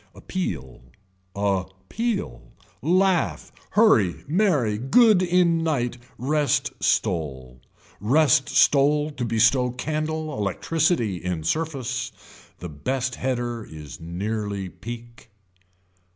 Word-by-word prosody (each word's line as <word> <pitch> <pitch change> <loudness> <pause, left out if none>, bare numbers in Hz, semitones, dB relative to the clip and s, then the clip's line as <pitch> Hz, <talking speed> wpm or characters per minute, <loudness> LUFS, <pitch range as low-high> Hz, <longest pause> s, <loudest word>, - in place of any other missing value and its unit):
Appeal, 65 - -5 0.5
a 100 -2 0 0.2
peal, 215 - -2 0.4
laugh, 185 +3 +1 0.3
hurry 110 - +4
merry, 145 - +1
good 210 - +5
in 175 -2 +3
night, 125 -6 -1 0.2
rest 145 +3 +1
stole. 65 -7 -1 0.4
Rest 140 +5 +3
stole 150 +2 +3
to 135 -4 -5
bestow 115 +2 +3
candle 155 +4 -3
electricity 120 - 0
in 90 -2 -4
surface. 130 - -2 0.5
The 90 - -7
best 125 - -2
header 120 -3 -2
is 75 -2 -10
nearly 100 +3 -3
peek. 120 +2 -10
125 Hz, 95 wpm, -24 LUFS, 100-155 Hz, 0.5 s, good